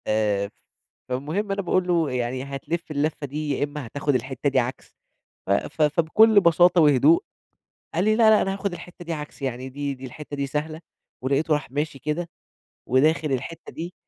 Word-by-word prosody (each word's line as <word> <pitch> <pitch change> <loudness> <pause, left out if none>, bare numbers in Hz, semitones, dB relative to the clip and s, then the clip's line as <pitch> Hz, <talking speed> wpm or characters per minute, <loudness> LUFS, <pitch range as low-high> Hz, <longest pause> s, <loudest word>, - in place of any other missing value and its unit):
آآ، 105 -2 +1
ف - - -19 0.6
فالمهم 155 +11 -2
أنا 200 0 -1
باقول 185 0 +1
لُه: 165 -5 +2
"يعني 125 +1 -2
هتلِّف 140 +5 -5
الَلفّة 150 0 -1
دي، 150 +2 -4
يا - - +1
إمّا 145 -3 -4
هتاخد 145 +3 -1
الحتة 130 +3 -1
دي 135 -1 +2
عكس،" 125 +1 -4 0.5
ف - - -5
ف 100 +9 -1
فبكُلّ 170 +8 +5
بساطة 175 0 +5
وهدوء 155 - +5 0.7
قال 175 - +2
لي: 215 +1 +3
"لأ، 225 -1 +6
لأ 215 - +6
أنا 195 - 0
هاخد 195 -1 -3
الحتة 175 0 -10
دي 165 - -3
عكس 150 -2 -7
يعني 130 -1 -3
دي، 140 +1 -3
دي 130 0 -9
الحتة 145 +3 -8
دي 140 0 -1
سهلة"، 155 +3 -3 0.4
ولقيته 140 +4 +1
راح 150 -4 -2
ماشي 145 0 -2
كده، 165 +4 -3 0.6
وداخل 150 +3 +3
الحتة 135 +5 -4
دي، 170 +2 -6
150 Hz, 185 wpm, -24 LUFS, 135-170 Hz, 0.7 s, لأ